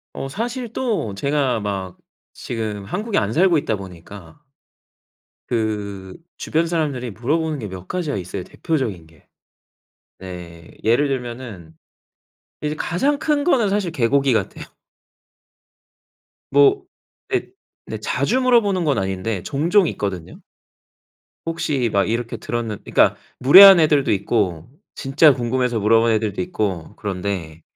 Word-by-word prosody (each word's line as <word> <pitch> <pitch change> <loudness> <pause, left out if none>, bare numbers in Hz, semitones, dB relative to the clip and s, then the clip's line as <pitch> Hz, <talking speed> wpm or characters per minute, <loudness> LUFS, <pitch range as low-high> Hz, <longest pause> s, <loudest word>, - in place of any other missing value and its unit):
어. 135 - -5
사실 235 - -4
또 210 - -2
제가 140 0 0
막 95 -3 -4 0.4
지금 110 -4 -5
한국에 210 - -2
안 100 +2 0
살고 175 +2 +4
있다 125 -6 -1
보니까 95 - -12 1.1
그 105 -5 -3 0.2
주변 165 +2 0
사람들이 145 -8 -2
물어보는 150 +7 -1
게 105 - -5
몇 95 -1 -9
가지가 175 - -2
있어요, 90 0 -5
대표적인 115 - -3
게. 80 - -24 0.9
네, 85 -3 -10
예를 120 +6 +3
들면은 120 -10 -6 0.9
이제 150 0 -1
가장 275 - 0
큰 295 -2 0
거는 245 - +3
사실 200 -3 0
개고기 135 0 +2
같아요. 115 - -2 1.9
뭐 140 0 +4 0.5
예 385 - 0 0.4
네 - - -5
자주 255 - 0
물어보는 220 -8 +2
건 145 -5 +1
아닌데 95 0 -2
종종 170 +7 +2
있거든요. 95 -5 -5 1.1
"혹시 150 -7 -1
막 100 +1 +1
이렇게 115 +1 -2
들었는" 115 -3 -4
그니까 - - +3 0.2
무례한 190 +8 +10
애들도 150 -3 +3
있고 95 -4 -1 0.3
진짜 140 +2 +4
궁금해서 125 -1 -1
물어본 115 +2 +3
애들도 110 -2 -1
있고 105 - -3
그런데. 90 -5 -4
120 Hz, 260 characters per minute, -21 LUFS, 100-160 Hz, 1.9 s, 무례한